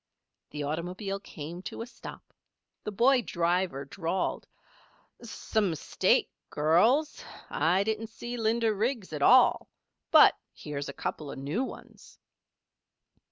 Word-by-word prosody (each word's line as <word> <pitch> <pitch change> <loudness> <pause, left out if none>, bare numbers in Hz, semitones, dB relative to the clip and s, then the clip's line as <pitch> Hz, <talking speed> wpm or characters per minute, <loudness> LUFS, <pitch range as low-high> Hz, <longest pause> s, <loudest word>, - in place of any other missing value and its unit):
The 150 -1 -5
automobile 180 +7 -4
came 170 -2 -8
to 225 - -6
a - - -7
stop. 250 - -12 0.5
The 210 - -3
boy 245 +5 +4
driver 170 - -1
drawled: 170 +5 -3 0.7
"Some 220 -3 -1
mistake, 160 -3 +1 0.2
girls. 220 - +2 0.3
I 180 +4 +2
didn't 220 +1 -2
see 240 +2 -7
Linda 225 -1 +1
Riggs 215 - -2
at 150 - -4
all. - - +5 0.4
But - - +7 0.2
here's 145 -1 -6
a - - -6
couple 150 +1 -5
of - - -8
new 145 - -2
ones." - - -11
190 Hz, 120 wpm, -28 LUFS, 160-225 Hz, 0.7 s, But